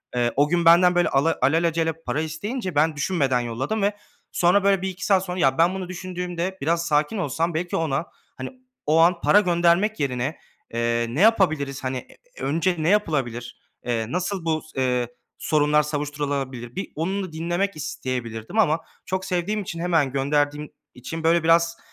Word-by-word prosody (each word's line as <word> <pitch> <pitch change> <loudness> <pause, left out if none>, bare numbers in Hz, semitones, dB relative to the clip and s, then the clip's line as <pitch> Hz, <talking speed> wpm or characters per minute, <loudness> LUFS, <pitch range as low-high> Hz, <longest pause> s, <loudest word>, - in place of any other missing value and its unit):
Eee, 120 -1 +1
o 145 +2 +3
gün 170 -1 +1
benden, 175 +2 +6
böyle, 175 0 +3
ala 145 +4 +2
alelacele 165 +3 +2
para 155 - -1
isteyince 185 - -4
ben 155 +1 +3
düşünmeden 145 -5 +1
yolladım 125 - -2
ve 205 +1 0 0.3
sonra, 180 +3 +3
böyle, 195 -2 +3
1-2 190 -1 -4
saat 190 -2 +3
sonra, 180 0 -4
ya, 135 -5 +3
ben 170 +3 +4
bunu 185 -2 -5
düşündüğümde 180 0 -4
biraz 170 +3 0
sakin 150 +7 +1
olsam 165 0 -1
belki 175 +3 -2
ona, 160 -1 -1 0.3
hani, 130 - -5 0.4
o 155 +2 +3
an 170 +1 +4
para 205 - +5
göndermek 175 +4 +2
yerine, 135 +2 -2 0.4
eee, 115 0 0
"Ne 140 +10 -1
yapabiliriz? 155 -12 +2
Hani, 130 0 -2 0.4
e - - -10
önce 165 +5 +1
ne 155 +2 +1
yapılabilir? 135 - 0 0.3
Eee, 115 -2 -1
nasıl 180 +2 -2
bu 160 -1 0
s 155 -4 -6
eee, 125 -1 +1 0.3
sorunlar 150 0 +2
savuşturulabilir?" 145 -4 -3
Bir 195 - -5
onu 190 +5 -2
da 185 - -7
dinlemek 175 +5 -2
isteyebilirdim 125 - -4
ama, 165 -6 +3 0.3
çok 185 0 -3
sevdiğim 190 +3 -1
için, 170 -3 -6
hemen 165 -6 +1
gönderdiğim 145 +2 0 0.2
için, 160 +6 -6
böyle, 165 0 +3
biraz 170 +1 +3
165 Hz, 170 wpm, -23 LUFS, 140-180 Hz, 0.4 s, benden